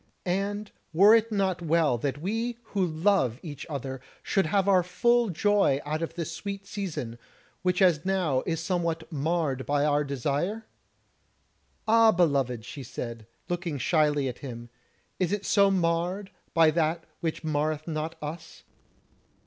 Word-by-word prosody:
And 200 +3 -2 0.2
were 200 +6 +7
it 230 0 +3
not 190 -4 0
well 165 -4 +2
that 140 +1 -2
we 225 +7 -2 0.2
who 195 -2 +2
love 160 - +1
each 145 -5 -7
other 135 -3 -5 0.2
should 195 -5 +1
have 195 +3 +1
our 190 -2 +5
full 235 +6 +2
joy 195 -5 +2
out 155 +2 -2
of 165 0 -4
this 170 -1 -3
sweet 200 +3 -6
season, 165 - -5 0.4
which 180 +1 +2
as 165 -5 +4
now 180 -9 +1
is 165 -2 0
somewhat 170 -2 -2
marred 150 -3 -1
by 145 0 +2
our 150 0 +2
desire?" 145 - -2 1.2
"Ah, 225 0 +6
beloved!" 140 - +1
she 140 - -8
said, 115 -4 -7 0.2
looking 175 -4 -2
shyly 150 -1 +2
at 125 - -5
him, 120 -3 -8 0.5
"is 185 -2 +1
it 205 -1 -2
so 200 -1 +4
marred 180 +2 0 0.2
by 165 -1 +6
that 165 +1 0 0.2
which 165 -2 -3
marreth 155 0 -1
not 160 0 -3
us?" 155 +3 -7
165 Hz, 150 wpm, -27 LUFS, 145-195 Hz, 1.2 s, were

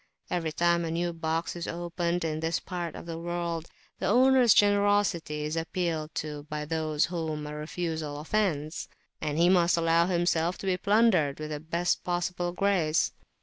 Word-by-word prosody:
Every 165 -3 -1
time 170 +2 +2
a 165 - -2
new 170 +1 -1
box 165 +1 -2
is 170 - -5
opened 175 0 -2
in 155 -1 -2
this 165 +1 0
part 175 -3 -5
of - - -8
the 165 -1 -5
world, 170 -1 -3 0.3
the - - -1
owner's 255 -1 +5
generosity 205 -7 +2
is 150 +1 -2
appealed 165 -1 -2
to 150 -1 -5
by 150 0 -3
those 155 -1 0
whom 160 -3 -3
a 150 - -6
refusal 155 -1 -4
offends, 155 -3 -1 0.3
and 150 0 -2
he 170 +1 +5
must 175 -2 +4
allow 165 +1 +3
himself 175 -1 +1
to - - -8
be 190 -1 +2
plundered 200 -8 +3
with 155 0 -5
the 150 - -3
best 170 +3 -1
possible 175 0 -1
grace. 180 -4 +1
170 Hz, 170 wpm, -28 LUFS, 155-175 Hz, 0.3 s, owner's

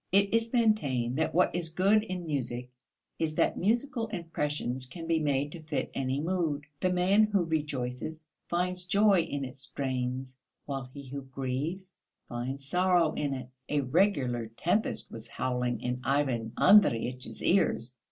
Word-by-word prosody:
It 200 +2 +3
is 230 0 +2
maintained 145 - +2
that 160 - +1
what 180 - +4
is 175 -2 0
good 195 +6 +4
in 185 -5 -5
music 125 -4 -3 0.5
is 155 -1 -1
that - - +2
musical 235 +4 0
impressions 150 - -2
can 165 +5 -8
be 165 -1 +2
made 145 -1 0
to 170 - -8
fit 155 -1 -3
any 135 0 -1
mood. 160 -3 -1 0.2
The 185 - +1
man 190 +4 +4
who 205 -4 +1
rejoices 150 -1 -3 0.2
finds 180 +1 -1
joy 200 +1 +4
in 145 -4 -3
its 130 +1 -8
strains, 130 -1 -2 0.3
while 135 -2 -4
he 140 +1 -9
who 140 +2 -5
grieves 135 +8 -4 0.3
finds 130 +3 -4
sorrow 180 0 +3
in 145 -2 -1
it; 130 -1 -7 0.2
a 150 -1 +2
regular 130 - +1
tempest 205 +6 0
was 115 0 -6
howling 125 0 -1
in 125 0 -2
Ivan 130 -4 0
Andreyitch's 130 - +4
ears. 130 -9 +2
150 Hz, 150 wpm, -30 LUFS, 130-180 Hz, 0.5 s, what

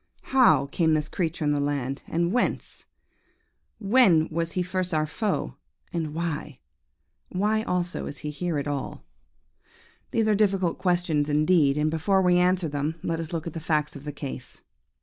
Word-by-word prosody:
How 255 - +6
came 160 +3 +1
this 150 -1 0
creature 165 -3 -2
in 145 - +2
the 145 - +1
land, 140 -1 -2
and 170 +1 0
whence? 245 - 0 0.9
when 200 -7 +4
was 165 +1 -1
he 180 - 0
first 180 -1 -2
our 155 0 +2
foe, 195 +6 -2 0.4
and 160 -3 -3
why? 155 -4 -3 0.7
Why 210 +4 +1
also 180 -4 -2
is 145 - -6
he 150 - -5
here 165 +1 -2
at 145 - -2
all? 145 -2 -4 1.0
"These 225 -1 +1
are 215 - +4
difficult 195 -4 +1
questions 175 -5 +1
indeed, 150 -1 +3
and 155 +1 +1
before 190 +4 +2
we 180 -1 +4
answer 180 -1 +2
them, 145 +2 -2
let 165 -1 -1
us 165 0 -5
look 165 -1 -3
at 170 - -5
the 165 - -4
facts 155 -2 -1
of 140 - -9
the 150 - -4
case. 135 -3 -8
165 Hz, 170 wpm, -26 LUFS, 150-180 Hz, 1.0 s, How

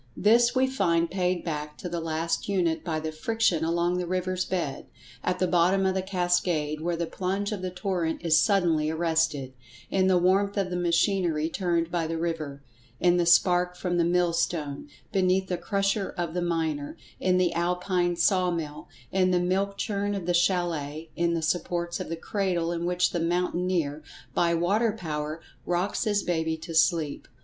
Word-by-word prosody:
This 235 +4 +4
we 260 +1 +4
find 170 -10 +1
paid 180 -1 -1
back 150 -2 -4
to - - -6
the 170 -1 -3
last 165 +3 -2
unit 175 -5 +1
by 160 -3 -2
the 155 0 -4
friction 180 0 0
along 170 +2 +1
the 180 - -3
river's 185 0 -1
bed; 170 -7 -3 0.4
at 180 0 0
the 185 - +1
bottom 180 +2 +3
of 190 - +2
the 190 - 0
cascade, 175 -5 0
where 170 +1 -1
the 170 0 -2
plunge 195 +4 -2
of 205 -3 -4
the 185 - -2
torrent 180 -3 -2
is 160 -1 +5
suddenly 170 -7 +2
arrested; 160 -4 0 0.4
in 190 -1 +2
the 185 -1 +4
warmth 195 +3 +2
of 190 -2 0
the - - -1
machinery 170 -2 +1
turned 170 -2 -1
by 170 -2 0
the 165 0 -3
river; 155 -4 -3 0.4
in 175 0 +4
the 175 -1 +1
spark 180 +1 +4
from 180 -1 -2
the - - +4
millstone; 170 - 0 0.2
beneath 190 0 +2
the 180 - 0
crusher 195 0 0
of 170 -2 -2
the 180 - -1
miner; 160 -4 -2 0.2
in 185 -1 +2
the 180 -1 +2
Alpine 175 +1 0
saw 185 0 +2
mill; 160 -4 -4 0.2
in 185 -1 +2
the 180 -1 +3
milk 195 +3 0
churn 200 0 -1
of 190 -4 -4
the 175 - +1
chalet; 170 -4 0
in 170 0 +1
the 165 - -2
supports 170 +1 -1
of - - -5
the 165 - -2
cradle 180 -3 -1
in 170 0 -2
which 180 0 +1
the 175 - -1
mountaineer, 175 -3 0 0.3
by 170 +3 +2
water 205 +7 +2
power, 155 -5 -4 0.2
rocks 180 +6 -1
his 205 -2 +1
baby 160 -2 -1
to 165 +1 -8
sleep. 160 -2 +1
175 Hz, 180 wpm, -27 LUFS, 165-185 Hz, 0.4 s, is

